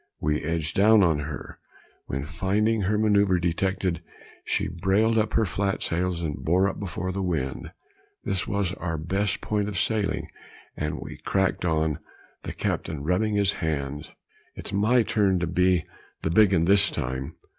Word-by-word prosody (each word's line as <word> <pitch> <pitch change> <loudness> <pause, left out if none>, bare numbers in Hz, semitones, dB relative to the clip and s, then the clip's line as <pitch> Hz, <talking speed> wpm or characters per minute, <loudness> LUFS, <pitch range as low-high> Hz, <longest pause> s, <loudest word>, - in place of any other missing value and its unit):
We 75 0 0
edged 80 0 -2
down 105 +1 +6
on 80 -4 +3
her, 75 0 -7 0.5
when 70 +2 -3
finding 105 +7 0
her 100 +2 +1
manoeuvre 100 -4 +3
detected, 90 0 -1 0.4
she - - 0
brailed 95 +6 +1
up 110 0 0
her 110 - +3
flat 100 0 -1
sails 85 0 -1
and 75 -3 -2
bore 90 +6 +3
up 100 - -4
before 95 -1 -3
the 95 +1 -3
wind. 80 -8 -2 0.5
This 95 -2 -2
was 100 -3 -1
our 85 -4 -3
best 90 +5 -1
point 105 -1 -1
of 100 - -5
sailing, 105 +1 0 0.5
and 75 0 -3
we - - -8
cracked 95 -2 0
on, 80 -3 +1 0.4
the - - -5
captain 75 -4 -3
rubbing 95 +6 +1
his 100 -1 +3
hands 75 -3 -3 0.5
"It's - - -7
my 110 +5 +3
turn 100 -4 +2
to 85 - 0
be 90 0 +2 0.4
the 80 - 0
big 105 +2 +5
un 85 -3 +3
this 100 0 +5
time." 65 +4 -4
90 Hz, 165 wpm, -26 LUFS, 80-100 Hz, 0.5 s, down